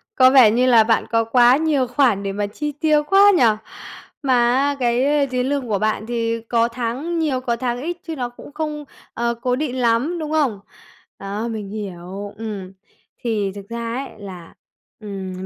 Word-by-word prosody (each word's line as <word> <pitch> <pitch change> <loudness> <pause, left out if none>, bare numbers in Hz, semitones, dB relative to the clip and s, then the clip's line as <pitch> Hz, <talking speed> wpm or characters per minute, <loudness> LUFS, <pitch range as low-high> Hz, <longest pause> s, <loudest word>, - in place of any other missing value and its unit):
Có 255 -1 +7
vẻ 255 -6 +7
như 245 +3 +2
là 235 -3 +6
bạn 225 0 +2
có 230 0 +3
quá 245 +2 +5
nhiều 300 -4 +1
khoản 240 -5 +2
để 195 - -2
mà 205 +1 -2
chi 295 +8 -4
tiêu 300 +1 +2
quá 395 +5 +6
nhỉ? - - +4 0.8
Mà 245 -2 +3
á 285 +1 +1
cái 265 +4 +2
tiền 250 0 -1
lương 280 -3 -1
của 205 -3 0
bạn 215 0 -1
thì 230 -1 -2
có 230 +1 +1
tháng 250 +8 -3
nhiều, 285 -5 0
có 240 -2 -1
tháng 245 0 -2
ít 340 +4 -4
chứ 325 - -4
nó 250 -4 -3
cũng 245 - -13
không, 300 -1 -4 0.3
ờ, 235 0 -1
cố 250 0 +1
định 260 -2 -3
lắm, 250 +8 +1
đúng 310 -1 -4
không? 280 -10 +1 0.6
Đó, 200 +3 -4
mình 215 -4 -5
hiểu, 200 -1 -7
ừm, 205 -4 -6 0.5
thì 210 -5 -1
thực 200 -1 -10
ra 230 0 -4
ấy 270 +2 -4
là, 185 -4 -10 0.5
ừm, 190 -3 -6
240 Hz, 190 wpm, -20 LUFS, 215-275 Hz, 0.8 s, Có